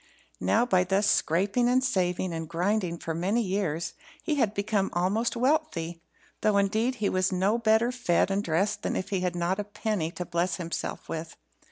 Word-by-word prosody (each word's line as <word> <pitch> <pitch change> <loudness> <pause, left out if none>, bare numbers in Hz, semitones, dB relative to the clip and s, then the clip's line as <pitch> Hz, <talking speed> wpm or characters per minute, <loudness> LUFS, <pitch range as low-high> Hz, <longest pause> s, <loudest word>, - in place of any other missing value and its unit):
Now, 235 - +2
by 185 -7 +3
thus 195 +3 +1
scraping, 200 +6 +2
and 255 +1 +3
saving, 185 -7 0
and 165 -1 -5
grinding 180 +1 0
for 165 - -4
many 195 +8 0
years, 185 -5 -2 0.3
he 315 - 0
had 225 -8 +1
become 200 -1 0
almost 200 +8 0
wealthy; 235 - 0 0.4
though, 210 -1 +3
indeed, 220 +6 +1
he 215 -4 -1
was 185 0 +1
no 195 +5 +1
better 225 +1 +3
fed 220 -7 +1
and 200 +1 0
dressed 195 +5 0
than - - -2
if 190 - -3
he 195 - 0
had 180 -1 -1
not 175 +3 0
a - - 0
penny 205 -4 -2
to 180 - -5
bless 175 +1 0
himself 170 -2 -4
with. 165 0 -6
195 Hz, 185 wpm, -28 LUFS, 175-220 Hz, 0.4 s, by